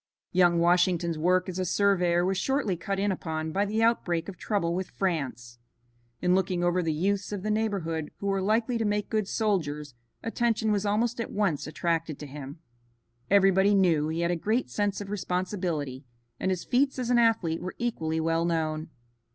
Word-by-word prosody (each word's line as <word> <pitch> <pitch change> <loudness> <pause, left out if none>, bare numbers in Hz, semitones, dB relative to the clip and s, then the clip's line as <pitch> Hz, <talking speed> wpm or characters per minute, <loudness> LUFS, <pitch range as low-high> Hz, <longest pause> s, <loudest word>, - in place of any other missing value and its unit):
Young 175 -1 +4
Washington's 175 -1 +2
work 180 +3 +2
as 185 0 -4
a - - +1
surveyor 180 -2 +2
was 190 +1 +1
shortly 265 -5 0
cut 195 +4 -3
in 200 +1 +1
upon 160 -3 -3
by 200 +4 +1
the 215 +2 0
outbreak 175 -8 +1
of 195 - -7
trouble 170 -3 -1
with 185 +1 -3
France. 125 - -3 0.6
In 180 - +3
looking 185 -1 +1
over 175 +1 +2
the 165 -2 0
youths 195 +6 -1
of 200 -2 -4
the 215 - 0
neighborhood 190 -8 -1
who - - -7
were 195 -1 +1
likely 225 +4 +1
to - - +1
make 205 -1 -1
good 215 -3 0
soldiers, 150 - -1 0.3
attention 225 -1 0
was 205 0 0
almost 230 +3 0
at - - -5
once 195 -10 0
attracted 165 -1 -1
to 150 - -8
him. 140 +1 -8 0.7
Everybody 195 0 +5
knew 165 -6 +3
he 160 +2 -2
had 170 0 +1
a - - +1
great 220 +9 -1
sense 205 -1 -1
of 200 0 -7
responsibility, 180 -8 -2 0.4
and 190 - 0
his 185 -2 -1
feats 270 +2 +1
as 250 -1 -1
an 240 - +5
athlete 220 -9 +2
were 185 - -5
equally 160 -10 -1
well 165 +1 +1
known. 160 -2 -1
185 Hz, 185 wpm, -27 LUFS, 165-205 Hz, 0.7 s, Everybody